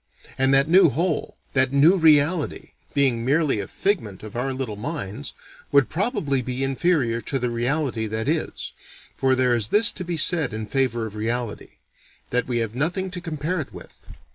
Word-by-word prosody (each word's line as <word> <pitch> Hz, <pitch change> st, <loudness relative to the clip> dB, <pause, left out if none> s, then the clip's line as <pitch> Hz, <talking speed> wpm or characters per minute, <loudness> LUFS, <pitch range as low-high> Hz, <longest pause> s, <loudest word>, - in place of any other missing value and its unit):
And 135 Hz, 0 st, +2 dB
that 135 Hz, +1 st, +5 dB
new 175 Hz, +1 st, +6 dB
whole, 165 Hz, +3 st, -2 dB, 0.2 s
that 130 Hz, -1 st, +3 dB
new 145 Hz, +7 st, +5 dB
reality, 160 Hz, -1 st, +2 dB, 0.2 s
being 130 Hz, -5 st, +2 dB
merely 140 Hz, -2 st, +1 dB
a 100 Hz, -, -4 dB
figment 115 Hz, -, -2 dB
of 110 Hz, 0 st, -9 dB
our 130 Hz, +3 st, -1 dB
little 130 Hz, -5 st, -4 dB
minds, 130 Hz, 0 st, -5 dB, 0.4 s
"would 140 Hz, -3 st, +4 dB
probably 160 Hz, -, 0 dB
be 125 Hz, +1 st, -3 dB
inferior 135 Hz, -4 st, +1 dB
to 135 Hz, -, -2 dB
the 125 Hz, -2 st, -2 dB
reality 120 Hz, -1 st, -1 dB
that 110 Hz, +3 st, -3 dB
is. 155 Hz, +1 st, -2 dB, 0.4 s
For 130 Hz, -1 st, +2 dB
there 125 Hz, -1 st, +2 dB
is 110 Hz, -3 st, 0 dB
this 210 Hz, +1 st, +5 dB
to 185 Hz, -, -6 dB
be 175 Hz, -1 st, -3 dB
said 160 Hz, -6 st, +2 dB
in 110 Hz, 0 st, -4 dB
favor 120 Hz, -1 st, 0 dB
of 110 Hz, -, -7 dB
reality: 115 Hz, +1 st, -3 dB, 0.6 s
that 125 Hz, 0 st, +1 dB
we 125 Hz, -2 st, -1 dB
have 115 Hz, -2 st, -2 dB
nothing 180 Hz, +8 st, -1 dB
to 180 Hz, -1 st, -5 dB
compare 160 Hz, +1 st, -3 dB
it 140 Hz, -, -9 dB
with. -, -, -12 dB
135 Hz, 180 wpm, -23 LUFS, 120-160 Hz, 0.6 s, new